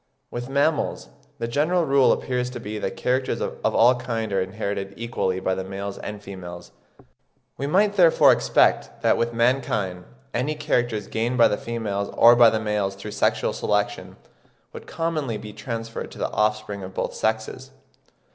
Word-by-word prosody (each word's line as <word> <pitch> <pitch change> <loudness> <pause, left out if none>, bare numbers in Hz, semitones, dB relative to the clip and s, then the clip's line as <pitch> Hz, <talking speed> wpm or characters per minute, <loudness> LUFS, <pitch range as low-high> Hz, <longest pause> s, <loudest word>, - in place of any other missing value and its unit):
With 120 +1 -5
mammals 145 +3 0 0.3
the 115 - -3
general 155 +8 +1
rule 135 -2 +4
appears 125 -1 -1
to 125 -1 -7
be 105 -1 -5
that - - -4
characters 130 +1 0
of - - -5
all 120 +2 +6
kinds 115 -4 -3
are 95 - +2
inherited 100 0 -4
equally 110 -5 -2
by 95 0 0
the 95 0 -3
males 100 +1 -6
and 105 0 -6
females; 90 -3 -9 0.8
we 140 - -3
might 200 +6 +3
therefore 170 -3 +6
expect - - +2
that - - +4
with 115 0 0
mankind 115 -7 0 0.3
any 135 +6 -1
characters 120 -8 -1
gained 115 +5 -2
by 120 - +7
the - - +1
females 105 -3 -3
or 120 +1 +8
by 120 -1 +7
the 110 - -1
males 105 -2 -1
through 100 +2 -8
sexual - - +1
selection - - -1 0.6
would - - -10
commonly 155 -8 -2
be 105 0 -9
transferred 115 -1 -5
to - - -12
the - - -2
offspring 105 -1 -1
of 95 0 -9
both - - -2
sexes. 110 +4 -2
115 Hz, 165 wpm, -24 LUFS, 100-125 Hz, 0.8 s, or